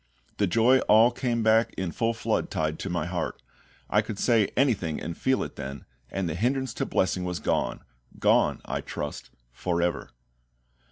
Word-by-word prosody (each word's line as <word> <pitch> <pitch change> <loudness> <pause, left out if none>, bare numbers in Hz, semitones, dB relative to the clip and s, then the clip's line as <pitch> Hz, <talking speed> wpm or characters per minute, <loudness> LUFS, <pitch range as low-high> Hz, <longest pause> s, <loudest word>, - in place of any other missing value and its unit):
The 100 - +2
joy 115 +7 +4
all 110 +3 +7
came 120 -2 -1
back 110 +1 +3
in 95 -3 -2
full 115 +4 0
flood 115 - -1
tide 80 0 -2
to 95 - -4
my 85 -2 -1
heart; 90 0 -3 0.5
I - - +3
could 105 - -6
say 110 -2 +3
anything 105 - +1
and 85 0 -5
feel 130 0 +1
it - - -8
then, 70 0 -6 0.2
and 95 -2 -2
the 80 - -2
hindrance 125 - 0
to - - 0
blessing 95 0 0
was 90 -1 -2
gone - - -1 0.4
gone, - - +3
I - - -3
trust, 75 -1 -6 0.2
for 85 +7 -2
ever. 85 -7 -1
95 Hz, 175 wpm, -27 LUFS, 85-115 Hz, 0.5 s, all